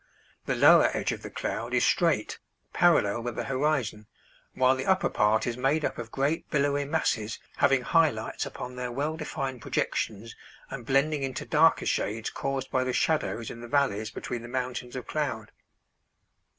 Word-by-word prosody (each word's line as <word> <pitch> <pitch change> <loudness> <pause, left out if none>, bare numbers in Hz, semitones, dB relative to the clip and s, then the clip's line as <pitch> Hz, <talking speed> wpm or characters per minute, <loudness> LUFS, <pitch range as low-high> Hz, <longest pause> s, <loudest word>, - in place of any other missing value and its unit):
The - - +1
lower - - +7
edge - - -1
of - - -5
the - - -7
cloud - - -3
is - - +3
straight, - - +1 0.3
parallel 120 -11 +3
with 120 0 -4
the - - -2
horizon, 135 -6 -1 0.5
while 130 0 +4
the 130 - -4
upper 190 0 +3
part 105 +1 +2
is 120 -1 -2
made 140 +4 +1
up - - -3
of 115 -1 -6
great 140 +4 -1
billowy 145 0 +1
masses, 110 -5 -1 0.2
having 135 -1 +4
high 165 +2 +4
lights 110 -3 -4
upon 125 0 -7
their 125 -1 -3
well 145 +5 -2
defined 135 -5 -4
projections 110 +2 -2 0.4
and 125 -4 -7
blending 140 +2 +2
into 135 -1 -3
darker 160 +2 +4
shades 110 +2 -1
caused 135 -1 -3
by 130 - +2
the 130 0 -2
shadows 135 -8 0
in 115 - -9
the 120 - -8
valleys 115 -5 +1
between 120 +1 -5
the 120 - -9
mountains 125 0 -4
of 125 - -5
cloud. - - -3
130 Hz, 175 wpm, -28 LUFS, 120-145 Hz, 0.5 s, lower